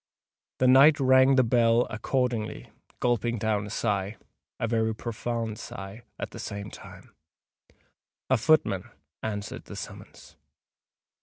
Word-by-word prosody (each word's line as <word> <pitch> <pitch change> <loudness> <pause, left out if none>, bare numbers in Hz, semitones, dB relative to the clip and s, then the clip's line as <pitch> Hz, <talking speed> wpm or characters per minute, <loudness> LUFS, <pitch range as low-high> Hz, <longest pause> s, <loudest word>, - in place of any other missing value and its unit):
The 130 - +2
knight 140 +4 +7
rang 130 0 +5
the 130 - +5
bell 115 0 +3
accordingly, 120 -1 -2 0.3
gulping 120 -1 0
down 105 -1 -1
a - - -8
sigh—a 105 +2 -4
very 110 -1 0
profound 115 -1 -4
sigh—at 100 +4 -8
the - - -9
same 100 0 -6
time. - - -13 1.1
A 130 - +3
footman 110 - +2 0.3
answered 105 -2 -5
the - - -9
summons. - - -10
115 Hz, 110 wpm, -27 LUFS, 105-125 Hz, 1.1 s, knight